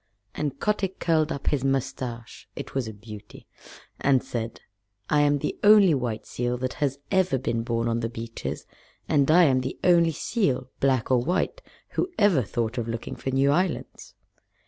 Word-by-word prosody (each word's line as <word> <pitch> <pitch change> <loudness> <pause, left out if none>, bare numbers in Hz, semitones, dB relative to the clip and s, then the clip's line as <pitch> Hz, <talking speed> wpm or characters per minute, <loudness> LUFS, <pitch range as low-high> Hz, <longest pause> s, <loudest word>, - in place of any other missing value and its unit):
And 140 -2 -3
Kotick 195 -3 -1
curled 160 -2 +1
up 140 - -5
his 140 -3 0
mustache 130 -3 -3
(it 140 - -7
was 135 -4 -1
a - - -5
beauty) 105 0 -12 0.5
and 135 -2 +3
said, 115 -1 -5 0.5
"I 150 - +4
am 145 0 +3
the - - -4
only 205 -4 +7
white 120 -5 -2
seal 120 0 -2
that 130 0 -3
has 140 -2 +1
ever 185 -6 +2
been 115 -2 -1
born 115 0 -1
on 115 0 0
the 115 -1 -2
beaches, 115 0 -6 0.4
and 140 -1 +2
I 175 +3 +7
am 130 -5 +3
the 130 +1 -5
only 170 -2 +5
seal, 145 - -1
black 130 -3 +1
or 125 - +5
white, 175 +9 -1 0.3
who 365 - -1
ever 200 -10 +4
thought 115 +2 -2
of 115 - -3
looking 115 0 -5
for - - -4
new 135 +1 +3
islands." 180 +3 -2
135 Hz, 175 wpm, -26 LUFS, 120-155 Hz, 0.5 s, only